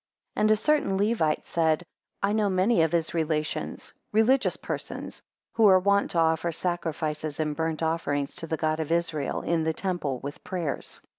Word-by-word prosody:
2 - - -1
And 215 - +4
a 215 - +6
certain 220 -5 +1
Levite 200 -7 +1
said, 160 0 +1 0.4
I 200 +1 +2
know 215 -2 +2
many 190 +2 +3
of 160 -1 +2
his 165 -2 0
relations, 155 -2 -2 0.2
religions 245 +6 +3
persons, - - -6 0.3
who 225 -2 +5
are 190 -1 +7
wont 200 +2 +2
to - - -3
offer 165 +1 +2
sacrifices 155 -3 -3
and 150 -1 -1
burnt 160 0 -2
offerings 145 -3 -1
to 165 - -6
the 160 - -1
God 155 +1 0
of 160 0 -3
Israel, 165 -4 -1
in 170 -1 +1
the 160 0 0
temple, 170 -8 -2
with 145 +1 -7
prayers. 175 -7 -4
165 Hz, 175 wpm, -27 LUFS, 155-195 Hz, 0.4 s, are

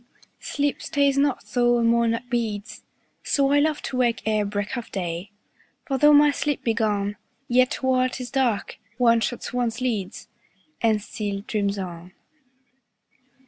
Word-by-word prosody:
10 - - -8
Sleep 290 0 0
stays 280 -1 +1
not, 280 -1 +1
though 240 -1 +3
a 235 - +1
monarch 230 0 +2
bids: 225 -4 -3 0.4
So 275 -1 +1
I 290 - +5
love 300 0 0
to 260 - -4
wake 240 -2 +1
ere 215 -1 +1
break 205 +3 -3
of 240 -2 -6
day: 175 0 -4 0.6
For 270 -2 -1
though 295 +2 +7
my 295 0 +6
sleep 290 0 -2
be 230 - +1
gone, 205 -2 -1 0.3
Yet 255 +2 +2
while 255 -1 +2
'tis 250 -1 -7
dark, 255 -6 0 0.2
one 235 -2 +4
shuts 245 +2 -3
one's 240 -2 -1
lids, 225 -7 -3 0.5
And 220 -3 +2
still 205 -3 -4
dreams 200 -1 -1
on. 180 -1 -7
235 Hz, 155 wpm, -24 LUFS, 210-260 Hz, 0.6 s, though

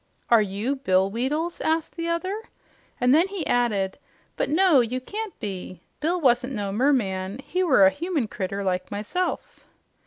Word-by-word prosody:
"Are 230 -2 +7
YOU 210 +7 -2
Bill 190 -6 +2
Weedles?" 295 +9 -2
asked 320 0 0
the 335 -1 -3
other. 370 +5 -2 0.6
And 250 +1 +4
then 330 +5 +5
he 385 -5 -4
added, 210 -6 0 0.4
"But - - -1
no, 335 -2 +5
you 245 +1 0
can't 420 +10 -6
be. 185 -4 -6 0.2
Bill 340 +4 0
wasn't 255 -2 +2
no 205 -4 -2
mermaid. 205 -4 0
He 360 +7 -2
were 265 - +5
a 190 - +6
human 310 - -2
critter 200 -1 -4
like 185 -1 -1
myself." 360 - -3
255 Hz, 160 wpm, -25 LUFS, 200-335 Hz, 0.6 s, Are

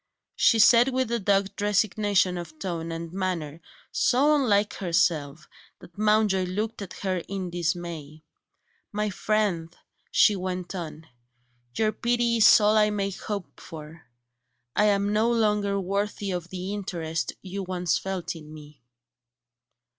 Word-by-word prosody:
She 230 - +4
said 235 +2 +6
that 265 - -2
with 260 -2 0
a 235 - 0
dogged 195 0 0
resignation 205 -2 +2
of 170 -3 -7
tone 165 -3 -4
and 165 0 -6
manner, 170 -5 -3 0.3
so 280 +5 +3
unlike 210 -8 +2
herself 165 -5 0 0.3
that 170 - -16
Mountjoy 210 -3 +2
looked 210 +5 -3
at 195 -2 -7
her 185 -1 0
in 190 -3 -4
dismay. 170 -3 -4 0.7
"My 210 0 -1
friend," 190 -6 -1 0.3
she 210 - +4
went 185 -1 -4
on, 160 -3 -7 0.7
"your 215 -1 +2
pity 235 +1 +1
is 225 - +8
all 210 +1 +3
I 210 0 +4
may 200 -1 -1
hope 200 0 -6
for; 160 0 -11 0.7
I 210 - +4
am 200 0 +2
no 220 +2 +2
longer 210 -3 +1
worthy 200 +1 -2
of 175 -1 -4
the 185 +2 -5
interest 170 -5 -3
you 195 +1 -5
once 180 -2 -1
felt 190 -3 -4
in 155 -2 -11
me." 150 -2 -13
195 Hz, 140 wpm, -26 LUFS, 170-210 Hz, 0.7 s, is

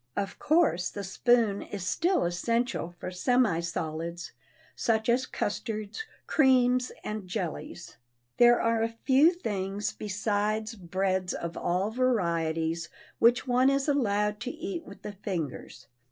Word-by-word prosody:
Of 195 -1 -3
course 300 - +2
the 200 - -6
spoon 215 +1 +2
is 195 -3 -6
still 350 - +1
essential 175 +1 -1
for 180 - -5
semi 220 -1 +2
solids, 170 0 -4 0.4
such 220 -1 0
as 250 +2 +2
custards, 215 - -3 0.2
creams 255 -3 +3
and 210 -3 -5
jellies. 175 -1 -5 0.4
There 240 0 +6
are 230 -1 +1
a 225 - +1 0.2
few 275 +5 +6
things 205 - -3
besides 210 +2 -1
breads 185 -1 -1
of 170 0 -5
all 185 +5 0
varieties 170 -9 0 0.3
which 240 +2 +4
one 250 +2 +4
is 275 +1 +1
allowed 210 -7 +1
to 245 +2 -4
eat 190 -8 -5
with 200 - -12
the 210 - -6
fingers. 165 - -5
210 Hz, 130 wpm, -28 LUFS, 180-245 Hz, 0.4 s, There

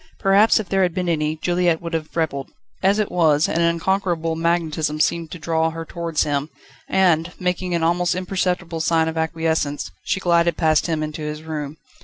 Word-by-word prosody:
Perhaps 205 +3 +4
if 215 - -4
there 195 +1 +1
had 180 -2 +1
been 180 -1 -1
any, 155 -2 0
Juliette 175 0 +1
would 170 0 -7
have 160 -1 -4
rebelled. 140 -4 -1 0.3
As 195 +2 +3
it 215 -1 -1
was, 155 -3 +3
an 170 - 0
unconquerable 170 -1 0
magnetism 160 -2 0
seemed 165 +1 +1
to 180 - -7
draw 160 0 0
her 165 0 -6
towards 165 -1 -1
him, 145 0 -1 0.4
and, 175 -3 +2
making 180 0 -1
an 170 - 0
almost 175 +1 +1
imperceptible 180 -2 -2
sign 160 0 +2
of 160 - -3
acquiescence, 160 -2 -1
she - - 0
glided 170 -2 +2
past 155 0 +2
him 160 -2 -1
into 155 0 -5
his 150 0 -5
room. 155 -2 -5
165 Hz, 185 wpm, -21 LUFS, 160-180 Hz, 0.4 s, Perhaps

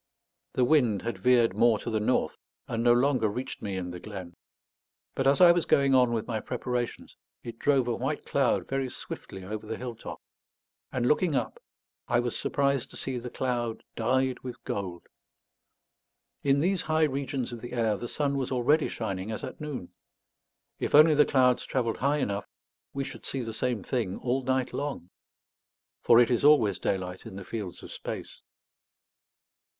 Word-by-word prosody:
The 125 - +3
wind 120 -8 +3
had 120 - -3
veered 125 -2 +4
more 115 -2 +4
to 115 - -5
the 110 - +1
north, 110 +4 +1 0.3
and 115 0 -2
no 120 - +6
longer 125 -1 +3
reached 125 +6 -5
me 100 -3 -3
in 90 -1 -4
the 90 - -7
glen; 95 -3 -8 0.8
but 135 - 0
as 140 +1 +4
I 175 -1 +9
was 170 -1 +1
going 140 -1 +3
on 125 -2 +5
with 115 -1 -1
my 115 -3 -2
preparations, 125 +1 -4 0.3
it 115 -1 -8
drove 135 -4 +2
a 120 - 0
white - - -3
cloud - - +1
very 135 -1 -1
swiftly 95 -5 -8
over 105 +3 -6
the 110 0 -4
hill 125 -1 -5
top; 115 - -9 0.7
and 120 -2 -1
looking 150 +3 +2
up, - - -2 0.5
I 120 - +2
was 120 -1 -2
surprised 140 -2 0
to - - -11
see 130 -2 -3
the 125 +1 -6
cloud 120 -3 -2
dyed 130 +3 +1
with 125 -2 -8
gold. 90 -4 -4 1.4
In 140 0 +3
these 185 +2 +1
high 155 0 +1
regions 135 -3 -1
of 120 -2 -7
the 120 0 -8
air 115 -3 +1
the 120 - -5
sun 140 -2 0
was 135 -1 -2
already 140 +5 +3
shining 95 -3 -4
as 110 - -5
at - - -7
noon. 145 -12 -6 0.9
If - - 0
only 155 +1 +8
the 150 0 +5
clouds 125 -2 +3
travelled 120 -4 -1
high 140 +3 +1
enough, 100 -7 -2 0.4
we 140 - -3
should 135 - -8
see 135 -2 -3
the 115 -1 -5
same 115 -2 -1
thing 110 -7 -2
all 130 +2 -1
night 130 0 0
long. 140 -11 -4 0.9
For 115 - +6
it 120 0 +4
is 120 - +1
always 130 -10 +5
daylight 90 -1 -3
in - - -9
the 100 -1 -8
fields 100 -6 -6
of - - -9
space. - - -7
125 Hz, 180 wpm, -28 LUFS, 110-135 Hz, 1.4 s, I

